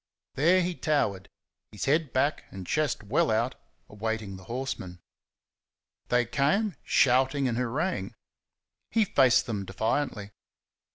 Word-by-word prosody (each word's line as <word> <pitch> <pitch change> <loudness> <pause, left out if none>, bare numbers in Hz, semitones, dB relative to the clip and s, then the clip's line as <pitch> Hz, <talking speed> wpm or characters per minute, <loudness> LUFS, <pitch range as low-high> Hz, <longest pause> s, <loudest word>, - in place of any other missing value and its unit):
There 170 +7 +4
he 180 +1 -1
towered, 100 - -1 0.4
his 105 - -5
head 150 0 +1
back 140 +3 0
and 95 -1 -8
chest 150 - 0
well 145 +11 +1
out, 115 +4 +1 0.3
awaiting 110 -1 -4
the 95 0 -12
horsemen. 115 -8 -5 1.1
They 120 0 +2
came, 150 - +1
shouting 130 +1 +3
and 120 - -1
hooraying. 125 - -2 0.7
He 225 -1 +2
faced 130 -9 +4
them 105 -4 -3
defiantly. 105 +2 -2
125 Hz, 120 wpm, -28 LUFS, 105-150 Hz, 1.1 s, There